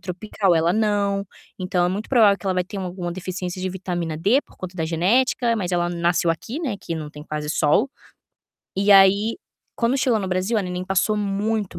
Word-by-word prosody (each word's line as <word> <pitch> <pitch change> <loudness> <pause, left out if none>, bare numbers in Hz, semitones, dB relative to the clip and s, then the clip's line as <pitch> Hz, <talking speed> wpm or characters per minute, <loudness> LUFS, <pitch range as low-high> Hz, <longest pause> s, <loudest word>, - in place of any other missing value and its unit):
tropical, 190 0 -1
ela 165 +2 +2
não, 205 -1 +1 0.4
então 180 -1 0
é - - +2
muito 200 +4 -4
provável 215 -6 +5
que 195 - -9
ela 185 - +1
vai 180 -1 0
ter 200 +1 -7
uma 185 - -3
alguma 175 -1 -5
deficiência 185 0 -5
de 185 - -2
vitamina 175 -3 -4
D, 200 - +3
por - - -23
conta 185 -1 -7
da 160 -3 -2
genética, 230 +8 +2
mas 185 -4 -2
ela 175 -1 0
nasceu 170 0 +1
aqui, 225 - -4
né, 240 -9 -2
que 165 - -4
não 155 -2 -6
tem 150 - -10
quase 150 -1 -4
sol". 165 - +2 0.8
E 200 +2 +1
aí, 200 +3 +6 0.4
quando 245 +3 +1
chegou 240 -4 +2
no 195 - -3
Brasil, 185 +5 0
a 205 - +1
neném 180 0 -4
passou 195 +3 +1
muito 205 -2 -2
190 Hz, 210 wpm, -22 LUFS, 175-210 Hz, 0.8 s, aí